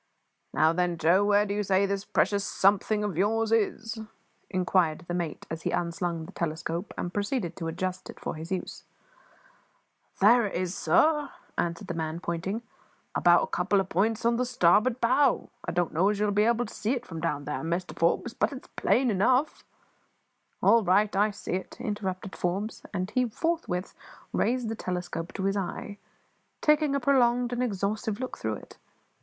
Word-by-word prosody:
"Now 160 +1 +3
then, 175 0 0
Joe, 170 +5 +4
where 205 0 +4
do 200 - -2
you 210 - 0
say 195 0 +2
this 200 0 -2
precious 200 -1 +1
`something' 205 +2 +2
of 185 -5 -3
yours 225 +3 +1
is?" 225 0 0 0.5
inquired 180 -3 +1
the 175 - -3
mate 170 -3 -3
as 160 0 -4
he - - -1
unslung 170 -1 -2
the 185 - -10
telescope 170 +3 -3
and 175 - -3
proceeded 205 -4 -2
to 165 - -4
adjust 185 +3 -4
it - - -10
for - - -4
use. 165 +4 -5 1.4
"There 225 +3 +6
it - - -6
is, 180 +1 -2
sir," 295 - +3 0.3
answered 170 -1 -2
the - - -3
man, 160 0 -3
pointing; 185 +6 -3 0.5
"about 175 0 +5
a - - -5
couple 195 +3 +2
of 190 -1 -2
points 220 +5 +1
on 235 0 +3
the 250 - +1
starboard 230 +3 +3
bow. 260 +3 +3
I - - -2
don't 175 0 0
know 180 +5 +3
as 210 - 0
you'll 210 0 +2
be 210 +1 +3
able 235 +1 +2
to - - -10
see 220 +4 -1
it 245 -1 -5
from 165 -1 -7
down 145 -4 -2
there, 150 +1 -3
Mr 170 +3 -3
Forbes, 170 +7 +1
but - - 0
it's 270 -2 -9
plain 250 -1 +2
enough 250 +9 +2 0.5
" - - -34
"All 230 -1 +6
right; 200 +3 +3
I 205 +2 +4
see 205 - -6
it," 185 - -4
interrupted 195 -2 -4
Forbes; 195 +5 -2
and 185 0 -3
he 250 -2 +1
forthwith 270 - -2 0.4
raised 245 -1 +1
the 225 - -2
telescope 180 -3 -4
to 190 - -4
his 195 +1 +1
eye, 200 +1 -4 0.6
taking 300 -2 +3
a - - +2
prolonged 245 -2 +3
and 245 - -1
exhaustive 215 0 -1
look 255 0 -5
through 110 -1 -2
it. - - -13
200 Hz, 185 wpm, -28 LUFS, 175-225 Hz, 1.4 s, There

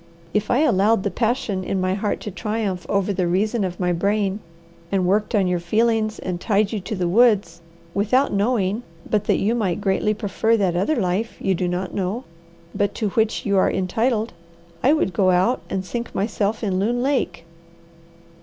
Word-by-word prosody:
If 210 0 0
I 255 - +3
allowed 215 -6 +3
the 200 - -1
passion 220 -3 -1
in 190 +1 -2
my 185 0 0
heart 205 +1 -2
to 210 - -5
triumph 200 -1 -3
over 200 0 +1
the 180 -2 0
reason 205 +5 +1
of 180 -2 -4
my 180 -1 +1
brain, 200 +2 0 0.5
and 190 -2 +1
worked 210 +5 +1
on 200 -2 +3
your 180 -1 0
feelings 220 +4 +1
and 180 -1 -4
tied 205 -1 +1
you 220 - -2
to 200 +4 -5
the 180 -2 -1
woods, 205 -3 +3 0.3
without 250 +7 +2
knowing 205 0 +1 0.3
but 210 -1 0
that - - +2
you 215 +4 +1
might 200 -7 0
greatly 205 +2 +1
prefer 220 +2 +1
that 190 -5 +1
other 195 - +1
life 205 +2 -1
you 195 - +1
do 180 0 -1
not 180 +1 -3
know, 200 +6 -2 0.5
but 205 0 -1
to 215 -3 -1
which 220 +2 0
you 200 -2 +2
are 185 - +4
entitled, 220 +4 0 0.5
I 270 - +4
would 300 - +1
go 185 +1 +3
out 185 +8 +2
and 190 -1 -2
sink 235 +4 -5
myself 205 +2 -1
in 190 -3 0
Loon 240 +5 0
Lake." 215 -12 -1
200 Hz, 190 wpm, -22 LUFS, 185-225 Hz, 0.5 s, are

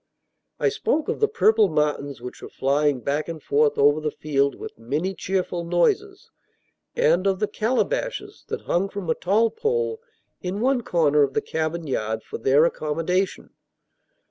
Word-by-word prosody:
I - - +3
spoke 310 - -1
of - - -2
the 435 - +4
purple 220 - +3
martins 150 -4 -1
which 125 0 -8
were - - -8
flying 140 0 +1
back 145 +4 -1
and 165 -1 -5
forth 145 0 +2
over 145 +2 +4
the 155 - -1
field 140 -2 0
with - - -9
many 150 +11 -2
cheerful 180 -1 -2
noises, 390 - 0 0.6
and 195 - +3
of 190 -1 +2
the 210 +2 0
calabashes 365 - -2
that - - -4
hung 190 +3 0
from 195 -5 -3
a - - +4
tall 215 +7 +2
pole 455 - -1 0.4
in 185 +2 -3
one 255 +2 +2
corner 150 -8 +2
of 135 -2 +1
the - - +4
cabin 160 +1 -3
yard, 110 -5 -2
for - - -7
their 140 +4 +4
accommodation. 170 +4 -1
170 Hz, 165 wpm, -24 LUFS, 145-215 Hz, 0.6 s, the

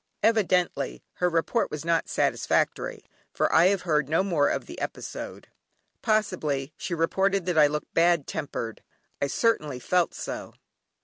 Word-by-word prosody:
Evidently 200 -5 +1
her 180 - +2
report 170 +7 +1
was 150 +1 -6
not 170 -1 +1
satisfactory, - - 0 0.3
for - - 0
I 165 +3 +7
have 195 -1 +1
heard 150 -5 +1
no 165 +4 +3
more 165 -7 +2
of - - -2
the - - -9
episode. - - -6 0.5
Possibly, 170 - 0
she 175 - -4
reported 190 +3 +1
that 175 -3 +2
I 150 - +7
looked 150 +1 -4
bad 170 -3 +3
tempered; 115 -5 -5 0.4
I 140 - +2
certainly 155 - +1
felt 175 +8 +1
so! - - -6
170 Hz, 145 wpm, -26 LUFS, 150-190 Hz, 0.5 s, I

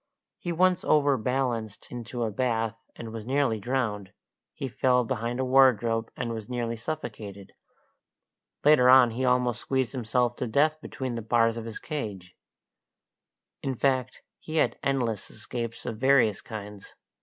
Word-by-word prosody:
He 175 - -3
once 180 +2 +2
overbalanced 125 -6 0
into 120 0 -4
a 110 - -1
bath, 115 -1 0 0.2
and 115 -1 -8
was 115 -1 -6
nearly 130 -2 +1
drowned; 105 -4 -2 0.4
he 135 - -5
fell 125 0 +2
behind 120 +1 -2
a 130 - +1
wardrobe, 120 -4 +4
and 120 -2 -2
was 110 -1 -7
nearly 120 -2 -2
suffocated; 110 -6 -6 1.1
later 145 -4 +6
on 130 -2 +7
he 125 +4 -3
almost 125 -1 +2
squeezed 130 -3 0
himself 120 -1 0
to 125 - -2
death 155 +6 +2
between 130 -5 -5
the 115 - -3
bars 115 +1 +2
of 115 -1 -6
his 115 -1 -6
cage 100 - -6 1.3
in 135 -1 -2
fact, 130 0 0 0.2
he 155 - -7
had 160 - +2
endless 120 -7 -1
escapes 115 +1 -6
of 110 -2 -4
various 125 -6 +4
kinds. 105 -2 -9
120 Hz, 145 wpm, -27 LUFS, 110-130 Hz, 1.3 s, on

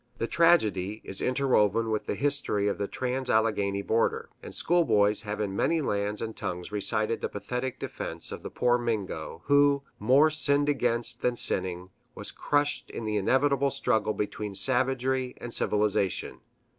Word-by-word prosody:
The - - -1
tragedy 110 - +2
is 95 - -3
interwoven 115 -4 +1
with 110 - -2
the - - -1
history 140 -8 0
of 100 - -2
the 100 - -1
trans 130 +3 -3
Alleghany 100 -3 +1
border; 115 +3 0
and - - -9
schoolboys 105 - +2
have 105 0 -5
in 100 -2 -2
many 165 +10 +1
lands 105 -6 -2
and 110 -1 -5
tongues 90 +2 -5
recited 105 +2 -1
the - - -2
pathetic 125 +5 -4
defense 85 0 -6
of - - -7
the - - -7
poor 125 0 +1
Mingo, 100 -8 -4
who, 145 0 +4 0.2
more 135 +8 +4
sinned 145 -1 +2
against 120 -3 0
than 125 -1 +1
sinning, 90 -4 +2 0.2
was - - -5
crushed 145 0 0
in - - -6
the 105 -1 -1
inevitable 140 +6 +2
struggle 110 -6 0
between 105 -1 -4
savagery 130 +3 +1
and 120 -1 -6
civilization. 105 -3 0
115 Hz, 155 wpm, -27 LUFS, 105-130 Hz, 0.2 s, who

